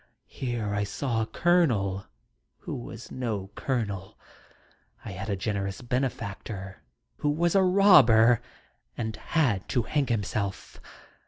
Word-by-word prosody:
Here 120 -5 -3
I 100 0 0
saw 115 +2 -2
a - - 0
Colonel 115 - +2 0.5
who - - -6
was 120 -1 -8
no 105 -6 -3
colonel. 100 -8 -3 0.9
I - - -5
had 100 +4 -6
a 100 - +1
generous 100 -1 -3
benefactor 110 -6 -4 0.4
who 145 - 0
was 170 +3 +1
a 195 - +5
robber 135 - +6 0.6
and 110 -2 -3
had 125 - 0
to 120 - +1
hang 145 +3 0
himself. 105 -3 -3
115 Hz, 120 wpm, -27 LUFS, 100-135 Hz, 0.9 s, robber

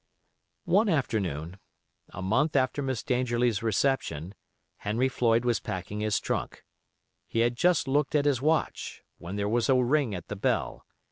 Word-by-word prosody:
One 200 +5 +3
afternoon, 95 - -1 0.5
a 95 - -7
month 135 +11 +1
after 130 +1 +1
Miss 130 -4 -2
Dangerlie's 120 -3 +1
reception, 110 - 0 0.4
Henry 115 +5 0
Floyd 120 -2 +1
was 120 -3 +2
packing 95 +3 -5
his 105 -1 +1
trunk. - - -3 0.6
He 115 - 0
had 120 +1 +2
just 165 +1 +2
looked 145 +2 +1
at 145 -1 +3
his 140 -4 +2
watch, 155 +2 -1 0.2
when 85 +3 -6
there 100 0 -1
was 115 +3 +1
a 135 - +5
ring 130 -2 +2
at 90 - -8
the 105 - -5
bell. 100 - -1
120 Hz, 155 wpm, -28 LUFS, 105-140 Hz, 0.6 s, a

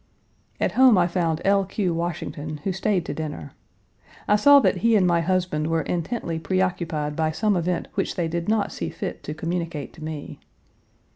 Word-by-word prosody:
At - - +1
home 255 -5 +6
I 175 - +4
found 170 -2 -1
L. 200 0 +4
Q. 190 -2 -1
Washington, 155 -2 -4
who 195 - -1
stayed 190 -1 0
to - - -4
dinner. 150 -2 -6 0.8
I 210 - +5
saw 285 +7 +7
that - - +2
he 230 0 +3
and 195 -3 +4
my 170 -1 +3
husband 175 -3 0
were 165 0 0
intently 170 -1 -3
preoccupied 170 -5 -1
by 160 0 +1
some 210 +6 +1
event 175 0 -1
which - - -2
they 170 -2 0
did 170 +3 -3
not 215 -2 +1
see 85 - -4
fit - - -5
to 150 - -6
communicate 165 -2 -4
to 160 - -11
me. 155 -2 -6
170 Hz, 185 wpm, -24 LUFS, 160-190 Hz, 0.8 s, saw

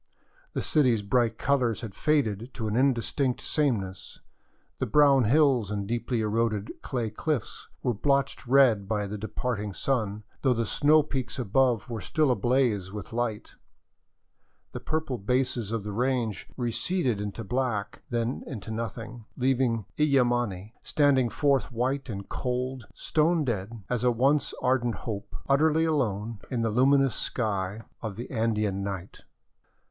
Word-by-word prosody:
The - - -2
city's 125 -8 +3
bright 115 +1 +1
colors 130 -5 +1
had 110 -5 -6
faded 125 -6 0
to 115 -4 -3
an 105 - -1
indistinct 130 0 +1
sameness, 105 - -2 0.6
the - - -1
brown 140 0 +5
hills 130 -4 +3
and 100 -1 -2
deeply 120 +1 -1
eroded 110 -1 0
clay 120 -4 -2
cliffs 140 +2 -3 0.2
were 125 - +1
blotched 135 +3 0
red 120 -7 +5
by 105 -1 0
the 105 +1 -5
departing 110 -1 -3
sun, 105 -4 -1 0.2
though 130 -2 +3
the 115 0 0
snow 150 +7 +4
peaks 135 -4 -4
above 125 -1 +2
were 115 -3 -5
still 155 -4 +1
ablaze 120 -4 +1
with 105 +2 -7
light; 115 -3 -2 1.2
the - - -5
purple 155 -6 -2
bases 125 0 0
of 115 -3 -2
the 105 - -4
range 120 -2 -1
receded 125 - 0
into 105 +2 -4
black, 115 -3 -2
then 120 +1 -1
into 110 -4 -6
nothing, 115 0 -5
leaving 125 -4 +1
Illimani 120 -8 +1
standing 135 -4 +3
forth 140 +3 +1
white 130 +3 -1
and 100 -3 -5
cold, 125 -1 -3
s.tone 160 0 +1
dead 110 -2 -3
as 125 -1 -1
a 125 - +5
once 135 +5 +2
ardent 125 -2 +2
hope, 105 -4 -5
utterly 155 +3 +3
alone 115 -8 -1
in 120 -3 -1
the 115 - +1
luminous 135 +2 +4
sky 100 -3 -2 0.2
of 110 -4 -4
the 120 +4 -7
Andean 110 -4 0
night. 95 -2 -5
120 Hz, 140 wpm, -27 LUFS, 105-135 Hz, 1.2 s, brown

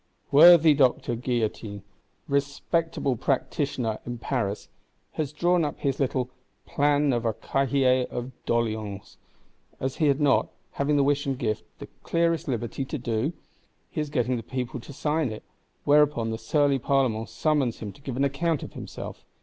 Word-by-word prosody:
Worthy 165 +1 +8
Doctor 130 -3 +2
Guillotin, 110 -4 -2 0.4
respectable 140 +1 0
practitioner 130 -2 -1
in 120 0 -5
Paris, 115 -5 -2 0.4
has 150 -3 -3
drawn 175 +3 +2
up 150 - -2
his 135 -2 -1
little 130 -2 0 0.3
"Plan 145 -1 +2
of 120 -2 -1
a 115 -1 +1
Cahier 130 -2 +1
of 125 +2 -5 0.2
doléances;"—as 110 +3 -4
had 145 -4 +3
he 150 - -1
not, 140 - +3 0.2
having 145 +1 +1
the 140 - +4
wish 145 0 +1
and 135 -2 -1
gift, 110 -4 -2
the - - -8 0.2
clearest 165 -1 0
liberty 120 0 -2
to 145 +3 -4
do? 120 +4 -1 0.6
He 155 - -2
is 150 - -3
getting 125 -3 0
the - - -4
people 125 +2 -4
to 120 - -11
sign 150 -1 -1
it; 110 - -8 0.4
whereupon 145 -6 +3
the 110 - -4
surly 145 -1 +2
Parlement 120 -4 +1
summons 145 -7 0
him 105 -2 -6
to 140 - -19
give 130 -3 -5
an 135 - +2
account 150 +3 0
of - - -9
himself. - - -8
135 Hz, 160 wpm, -26 LUFS, 120-145 Hz, 0.6 s, Worthy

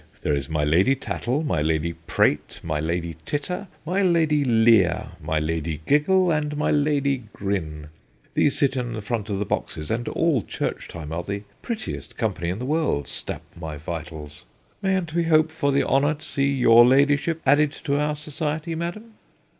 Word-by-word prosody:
There 75 - +1
is 70 +1 -2
my 75 -1 0
Lady 90 - +4
Tattle, 135 +2 -2
my 85 - 0
Lady 80 +2 0
Prate, 75 -2 0
my 75 -1 -2
Lady 85 +1 -2
Titter, 180 - -3 0.2
my 185 +5 0
Lady 160 -5 +3
Leer, 115 -6 +4
my 80 - -1
Lady 80 0 -2
Giggle, 175 +5 +3
and 150 -1 -1
my 150 - +1
Lady 140 -4 +1
Grin. 80 -7 -3 0.4
These 145 - +2
sit 140 -1 +2
in 120 -2 -2
the 110 -2 -5
front 110 -1 -3
of 100 - -1
the 105 - -1
boxes, 75 -4 -3
and 115 +2 -2
all 160 -8 +1
church - - -4
time 80 -3 -8
are 80 +2 -2
the 100 +3 -5 0.2
prettiest 225 -3 -5
company 95 -7 -1
in 90 - -2
the 125 - -5
world, 150 - 0
stap - - -4
my 80 -3 -6
vitals. 75 -1 -7 0.4
Mayn't 190 -4 0
we 170 0 +1
hope 160 -1 +4
for 140 -3 0
the 140 - +3
honour 145 +3 +3
to 150 - -11
see 140 -1 +1
your 120 -3 +6
ladyship 145 +5 +3
added 145 +2 +4
to 140 -1 +1
our 150 0 0
society, 150 +2 -3
madam 175 +8 -5
130 Hz, 180 wpm, -24 LUFS, -, 0.4 s, your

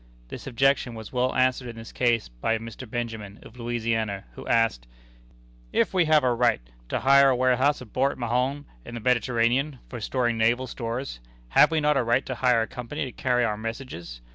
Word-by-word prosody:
This - - -8
objection 135 -1 +1
was 110 +1 -9
well 125 0 0
answered 130 0 +2
in 120 - -7
this 115 0 -10
case 120 -3 +1
by - - -1
Mr. 115 +2 -9
Benjamin, 110 -4 -5
of 120 +2 -14
Louisiana, 115 -4 -2
who - - -10
asked: 115 - +1 0.8
"If - - +1
we 180 -2 +3
have 155 -2 +4
a 125 -1 +3
right 120 - +2 0.3
to - - -1
hire 140 +1 +6
a 130 - +3
warehouse 130 +2 +2
at 110 - -17
Port 135 +2 +1
Mahon, 125 +4 -1 0.2
in 120 - -9
the - - -4
Mediterranean, 125 +4 +1
for 120 -3 -7
storing 120 -1 0
naval 120 +3 +2
stores, 120 - -5 0.3
have - - +6
we 160 - +1
not 150 -1 +2
a 130 - +2
right 120 +3 +1
to 130 - -3
hire 125 -2 +2
a - - -5
company 135 +3 -5
to 130 - -6
carry 125 -2 +1
our 105 -2 -1
messages? 110 - -7
120 Hz, 195 wpm, -26 LUFS, 115-130 Hz, 0.8 s, hire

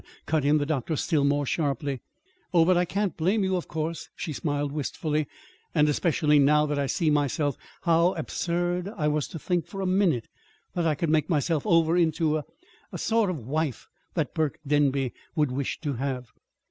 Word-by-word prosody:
cut 155 -3 +1
in 145 +2 +4
the 145 - 0
doctor, 155 +1 -1
still 150 0 +1
more 145 0 +2
sharply. 140 -2 -1 0.5
"Oh, 165 -1 +6
but 185 +1 +4
I 175 +1 +3
can't 195 +1 -1
blame 190 +6 +1
you, 190 0 +1
of 180 - -3
course," 160 +1 -4
she 155 - -4
smiled 145 0 -1
wistfully; 150 +1 -2 0.5
"and 150 -1 +5
especially 150 -1 +3
now 150 +2 +5
that 150 -1 -1
I 140 - 0
see 155 +4 +1
myself 145 0 +1 0.3
how 170 +1 +3
absurd 175 +2 -1
I 150 -3 +1
was 150 -1 0
to - - -7
think, 175 +2 -1
for 195 - -7
a 190 - -1
minute, 185 - +2 0.5
that 170 -2 0
I 155 - +2
could 155 +2 -1
make 155 +2 +2
myself 155 -1 +1
over 165 0 +4
into 160 -2 +2
a - - -1
a - - -7 0.5
the - - -3
sort 225 -3 +2
of 150 -11 -4
wife 150 -1 -2 0.3
that - - -1
Burke 155 -4 0
Denby 140 -3 +2 0.2
would 150 -5 +2
wish 135 +1 -2
to 145 -4 -2
have." 130 -1 -3
155 Hz, 195 wpm, -27 LUFS, 145-170 Hz, 0.5 s, Oh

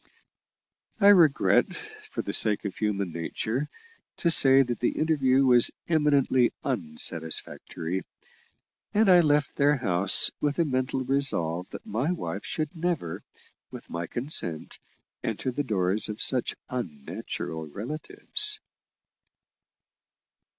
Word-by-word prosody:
I 200 -1 +6
regret, 170 -8 +4
for 430 0 -8
the - - -5
sake 105 -1 +4
of 100 - -4
human 100 -4 -2
nature, 110 - -3 0.5
to 170 - +2
say 135 -3 +6
that 120 -3 -4
the 120 - -1
interview 135 -4 +2
was 125 -2 +6 0.2
eminently 145 -6 +2
unsatisfactory; 80 - -2 0.9
and 215 +1 +4
I 180 - +7
left 150 -2 +1
their 145 +1 +3
house 95 -7 +4
with 145 -1 -1
a 170 - +2
mental 130 -1 -1
resolve 95 -11 0
that - - -10
my 125 - -1
wife 180 - -5
should 155 0 -4
never, 165 - -3 0.5
with - - -11
my 85 0 -4
consent, 120 - -2 0.4
enter 115 +4 -3
the 135 - -2
doors 100 -4 -1
of 105 - -6
such 125 -3 +1
unnatural 80 - -6
relatives. 155 - -3
130 Hz, 115 wpm, -26 LUFS, 95-150 Hz, 0.9 s, I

